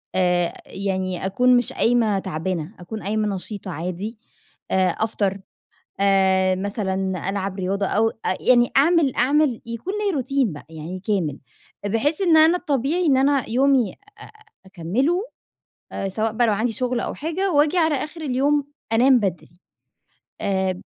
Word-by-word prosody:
آآ 180 -2 +1
يعني 190 -2 -3
أكون 250 +6 +4
مش 245 - -1
قايمة 225 -4 +2
تعبانة، 180 0 -4
أكون 210 +5 -7
قايمة 210 0 -1
نشيطة 190 0 -6
عادي، 180 +7 -5 0.5
آآ 185 -1 +3
أفطر، 200 0 -1 0.6
آآ 190 -1 +3
مثلًا 190 -2 -2
ألعب 195 -1 -3
رياضة 195 +2 -1
أو 225 +3 +2
أ 225 - -3
يعني 240 -1 +4
أعمل 305 -2 +4
أعمل 270 -1 +2
يكون 230 - -5
ليّا 395 - +1
روتين 265 - 0
بقى 145 - -11
يعني 160 +3 -7
كامل، 180 -8 -1 0.5
بحيث 270 - 0
إن 335 -4 +5
أنا 325 +3 +6
الطبيعي 300 +3 0
إن 275 -4 +4
أنا 275 -1 +2
يومي 255 -3 +2
أ - - -21 0.7
أكمِّله، 230 - -1 0.8
سواء 215 +3 -2
بقى 235 +1 +2
لو 215 - +3
عندي 225 +3 0
شُغل 250 +1 -1
أو - - -3
حاجة 350 +5 -2
وآجي 295 +3 +3
على 320 -3 +3
آخِر 305 +4 -5
اليوم 285 +1 +1 0.3
أنام 255 +2 +5
بدري. 175 -3 -4 0.8
آآ 190 -2 -1
220 Hz, 145 wpm, -22 LUFS, 190-270 Hz, 0.8 s, أنا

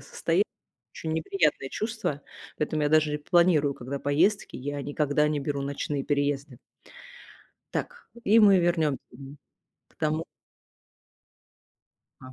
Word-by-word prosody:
состоянии. - - 0 0.5
Очень 160 - -4
неприятное 160 -3 0
чувство. 215 - -3 0.4
Поэтому 150 0 -1
я 145 - +2
даже 155 -1 +3
и - - -2
планирую 155 -3 +3
когда 135 +3 -5
поездки, 160 +9 +1
я 145 +2 -4
никогда 145 +1 +1
не 150 -1 0
беру 140 0 -2
ночные 140 0 -3
переезды. 140 -2 -1 1.2
Так, 485 0 -5 0.2
и 215 +3 +5
мы 200 -3 +7
вернем 160 -5 +1
мгм, 140 +1 -11 0.5
к - - -31
тому 155 +1 -1 2.0
А. 130 0 -11
150 Hz, 120 wpm, -27 LUFS, 140-160 Hz, 2.0 s, мы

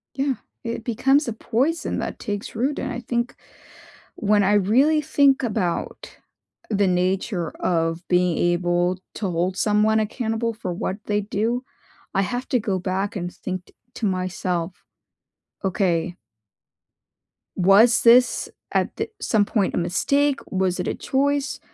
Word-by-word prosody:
Yeah. 270 -1 0 0.3
It 230 -1 -4
becomes 270 +5 +2
a 235 - -2
poison 265 +10 -1
that - - -4
takes 205 +1 -5
root, 265 +6 0
and - - -3
I 245 - -4
think 240 0 -2 0.8
when 210 0 +2
I 200 +1 +3
really 255 +10 +4
think 280 -3 +3
about 205 -7 -2 0.5
the 205 -3 +2
nature 180 -1 0
of 165 0 -1
being 180 -1 +2
able 175 +1 +1 0.2
to 200 -3 -2
hold 180 +2 -1
someone 215 +1 +3
accountable 225 +1 -1
for 215 -5 -5
what 185 +2 -3
they 210 0 +1
do, 220 +5 -1 0.5
I 195 - +2
have 245 +6 -3
to 250 - +2
go 200 -4 -1
back 190 +3 -2
and 175 -1 -4
think 185 -1 -5
t - - -23 0.2
to 225 - -2
myself, 185 -2 -2 0.8
"Okay" 180 -2 0 1.4
"was 205 +6 +5
this 245 +1 +5 0.2
at - - +1
th 440 0 -2
some 210 -3 +2
point, 200 -2 0
a - - -2
mistake? 280 +11 +1
Was 185 -1 0
it 180 - -2
a - - -2
choice?" 280 +1 0
205 Hz, 145 wpm, -23 LUFS, 185-245 Hz, 1.4 s, was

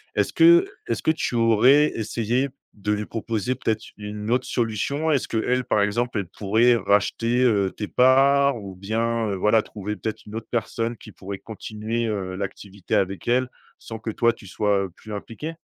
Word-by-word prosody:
est-ce - - +1
que 345 +2 +6 0.2
est - - 0
ce - - -8
que - - +4
tu 160 -5 -2
aurais 120 +6 +5
essayé 115 +4 -1 0.3
de 105 0 -3
lui 105 0 -1
proposer 115 +2 -2
peut-être 110 -3 -2
une 105 +1 -5
autre 125 +1 +1
solution? 130 +7 -1
Est 145 - +3
ce - - -6
qu'elle 125 +3 0
par 105 - +2
exemple, 115 +4 0
elle 100 - -4
pourrait 110 +6 +3
racheter, 115 +4 +1
heu, 100 -6 +2
tes 105 - -5
parts 140 +2 +4
ou 95 -1 -8
bien, 115 +3 -1
heu, 100 - -1
voilà, 105 +4 +3
trouver 105 0 -6
peut-être 110 -1 -5
une 105 - -9
autre 115 0 -6
personne, 115 0 -2
qui - - -13
pourrait 100 0 -7
continuer, 110 +1 -4
heu, 95 -4 -3
l'activité 100 -1 -4
avec 95 -2 -1
elle, 125 +1 +2 0.3
sans 115 -1 -8
que 110 - -5
toi 115 +2 +2
tu 110 -3 -14
sois, 100 0 +1
heu, - - -8
plus 110 +5 -13
impliqué? 115 +10 -6
110 Hz, 190 wpm, -24 LUFS, 105-120 Hz, 0.3 s, que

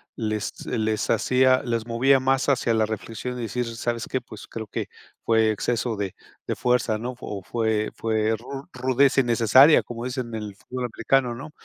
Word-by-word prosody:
les 110 -2 -3
les 110 -1 -1
hacía 130 0 +3
les 115 -2 -2
movía 130 +4 +3
más 135 +1 +1
hacia 125 -4 +2
la 110 -1 +2
reflexión 115 +3 -5
y 120 - -4
decir: 120 +3 -2
"¿Sabes 115 0 -2
qué? 130 - 0
Pues 110 -4 -12
creo 110 -1 -6
que - - -4 0.4
fue 110 -1 +3
exceso 115 +2 -1
de 100 -2 -4 0.3
de - - -1
fuerza", 125 -3 +1
¿no? 125 +3 -5
O 100 -6 -6
fue 110 -1 -1
fue 110 0 0
ru 135 +5 -8
rudeza 130 +2 +3
innecesaria, 120 +5 +6
como 120 0 -6
dicen 130 -1 -3
en 110 - -3
el 105 -2 -8
fútbol 125 +5 -5
americano, 125 +1 +1
¿no? 140 +5 -9
120 Hz, 180 wpm, -24 LUFS, 110-130 Hz, 0.4 s, innecesaria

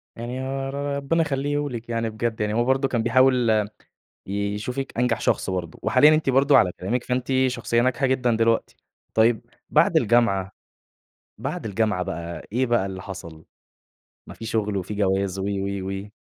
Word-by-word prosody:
يعني 120 +3 -5
هو 135 0 -3
ر- - - -6 0.2
ربنا 140 +4 +1
يخلّيه 145 0 -1
لِك 120 -2 -7
يعني 115 -1 -1
بجد 110 0 -3
يعني 105 0 0
هو 120 +2 +2
برضه 135 +1 +2
كان 120 -4 -1
بيحاول 125 0 +4
م - - -7 0.6
يشوفِك 105 +7 -3
أنجح 125 0 +1
شخص - - +1
برضه 90 -3 -4
وحاليًا 155 +1 +6
أنتِ 155 -3 0
برضه 135 +2 +5
على 90 - +4
كلامِك 115 +7 -1
فأنتِ 125 0 -2 0.2
شخصية 120 -2 0
ناجحة 130 +2 +1
جدًا 130 -3 +1
دلوقتي. 115 0 +1 0.4
طيب 110 0 +3 0.3
بعد - - +4
الجامعة 100 -5 +2 0.9
بعد - - -4
الجامعة 105 -3 0
بقى 85 0 -6
إيه 125 +4 +1
بقى 120 -5 +1
اللي 95 -1 -6
حصَل؟ 85 -5 -9 0.8
ما - - -10
في 115 - -8
شُغل 105 -2 -1
وفي 95 +2 -3
جواز 100 -1 0
و، 95 - -2
و، 100 -1 -2
و. 95 +1 -6
115 Hz, 170 wpm, -24 LUFS, 100-130 Hz, 0.9 s, وحاليًا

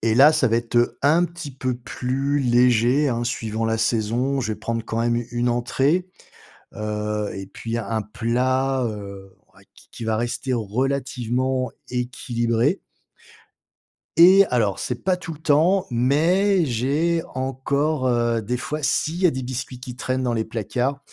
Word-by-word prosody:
et 110 0 +1
là, 140 +6 +7
ça 155 -5 +2
va 115 - +2
être 120 0 0
un 155 +5 +4
petit 170 -4 -7
peu 130 -1 -3
plus 130 +3 -2
léger, 125 +2 +3
hein, 120 -2 -1
suivant 115 -2 -2
la 110 0 0
saison. 115 +5 0
Je 110 -4 -2
vais - - -7
prendre 115 0 -3
quand 115 0 -2
même 120 0 +1
u 120 -1 -3
une 120 0 0
entrée, 135 +9 +1 0.7
heu, 105 0 -3
et 95 0 -6
puis 115 +4 -5
un 110 0 -2
plat, 130 +5 0
heu, 100 -3 -7 0.2
ouais - - -20
qui - - -20
qui - - -8
va 110 -1 0
rester 120 +3 -2
relativement 130 +2 -1 0.2
équilibré. 120 - 0 1.4
Et 190 +3 +8
alors 105 -6 0
c'est 125 -1 -4
pas 185 0 +2
tout 180 -2 -7
le 150 - -12
temps, 160 +5 +3
mais 165 +10 +3
j'ai 145 +7 0
encore, 135 +2 -1
heu, 120 -2 +1
des 120 +4 -2
fois 150 +5 -4
s'il 155 +3 0
y 185 - +6
a - - +4
des 130 0 -4
biscuits 125 0 -5
qui 125 -1 -8
traînent 130 0 -2
dans 120 -1 0
les 110 -1 0
placards. 120 +5 -2
125 Hz, 165 wpm, -23 LUFS, 115-140 Hz, 1.4 s, Et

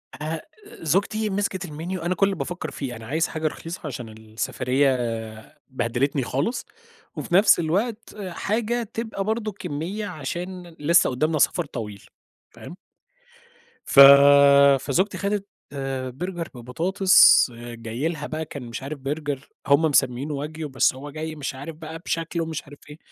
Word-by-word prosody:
آآ 155 +4 -4 0.4
زوجتي 205 +7 0
مسكت 195 -1 -2
الmenu، 165 +4 -5
أنا 180 +1 0
كل 190 - +3
اللي 195 -1 -1
بافكر 175 +2 -5
فيه، 130 -4 -5
أنا 110 -1 -10
عايز 160 +6 0
حاجة 155 0 -2
رخيصة 165 +3 -6
عشان 120 -4 -6
السفرية 125 +5 -1 0.7
بهدلتني 130 +3 -1
خالص، 140 - -2 0.5
وفي 175 - -2
نفس 200 -1 +6
الوقت 210 +8 -2
حاجة 225 +6 -1
تبقى 225 -3 -3
برضه 220 +1 -2
كمية 185 +2 -5
عشان 175 +3 -6
لسه 165 +4 +4
قدامنا 155 +5 0
سفر - - +2
طويل، 105 -7 -7 0.5
فاهم؟ - - -11 1.1
ف - - +3 0.8
فزوجتي 160 +10 0
خدت 200 0 -2 0.7
Burger 175 -2 -4
ببطاطس 175 +11 +5
جاي 120 +3 -4
لها 155 -3 -4
بقى 160 +1 -4
كان 140 -3 -8
مش 120 +2 -7
عارف 140 +2 -6
Burger 145 0 -3 0.3
هم 140 +2 +5
مسمينه 145 -1 +1
wagyu 155 0 -7
بس 135 -1 +2
هو 140 +3 -8
جاي 155 +1 -5
مش 140 -2 -5
عارف 145 +4 -8
بقى 160 +1 -8
بشكله 165 0 -2
ومش 160 -2 -5
عارف 145 0 -14
إيه. 150 - -10
155 Hz, 145 wpm, -24 LUFS, 135-185 Hz, 1.1 s, نفس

